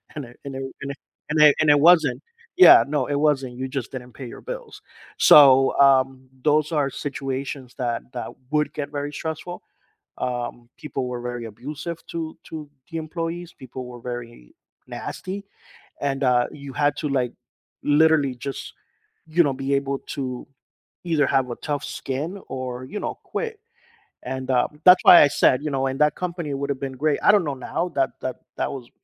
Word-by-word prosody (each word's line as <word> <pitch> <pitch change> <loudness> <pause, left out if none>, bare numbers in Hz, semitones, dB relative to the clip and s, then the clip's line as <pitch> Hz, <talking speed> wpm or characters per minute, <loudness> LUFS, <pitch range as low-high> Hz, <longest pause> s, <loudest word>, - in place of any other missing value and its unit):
And 145 -3 -5
it 120 0 -16
and 140 -1 -6
it 135 - -4 0.2
and 140 0 -4 0.4
and 150 0 0
it 150 -2 +7
and 155 - +3
it 145 - +5
wasn't, 160 -4 +5 0.3
yeah, 370 - +9
no, 145 -2 0
it 145 - -2
wasn't, 140 -4 +1
you 130 +1 -3
just 130 -3 -4
didn't 125 -3 -8
pay 135 - -8
your - - -10
bills, - - -8 0.4
so, 135 -2 +7
um, 135 -1 +3 0.2
those 155 +1 +2
are 145 -3 +1
situations 135 -2 -5
that 120 -3 -1
that 120 - -5 0.2
would 150 0 +1
get 145 -1 -4
very 145 0 -4
stressful, 160 +4 -5 0.6
um, 120 -1 -4
people 135 -4 -4
were 125 -1 -5
very 120 -1 -5
abusive 150 +9 -7
to 160 -1 -5
to 155 -2 -8 0.2
the 165 - -3
employees, 165 +2 -4
people 130 0 -9
were 125 -1 -10
very 120 - -8 0.3
nasty, 195 +2 -6 0.6
and, 140 -1 -1
uh, 125 -1 +3
you 140 -2 -9
had 145 +1 +1
to, 150 - -2
like, 130 -3 0 0.5
literally 150 -2 +4
just, 135 +3 -6 0.6
you 165 +2 +4
know, 140 -3 0
be 135 +1 -1
able 140 0 -1
to 130 -3 -5 0.6
either 160 -4 +2
have 135 -2 +1
a - - -3
tough 145 -2 -3
skin 145 +8 -4
or, 130 -1 -5
you 205 +11 -6
know, - - -3
quit 455 -2 -4 0.6
and, 130 +1 -5
uh, 125 -1 +3 0.2
that's 180 0 +8
why 175 - +10
I - - +7
said, 135 -2 +3
you 150 - -1
know, 135 -1 0
and 135 +1 -4
that 150 -1 +4
company 170 -5 -4
would've 140 0 -3
been 135 -1 -4
great, 155 -2 +2
I - - +7
don't 205 -4 +3
know 145 -2 -2 0.2
now, 180 - -1
that 135 -1 +2
that 130 - -4 0.2
that - - -1
was 125 -3 -8
140 Hz, 180 wpm, -23 LUFS, 130-155 Hz, 0.6 s, why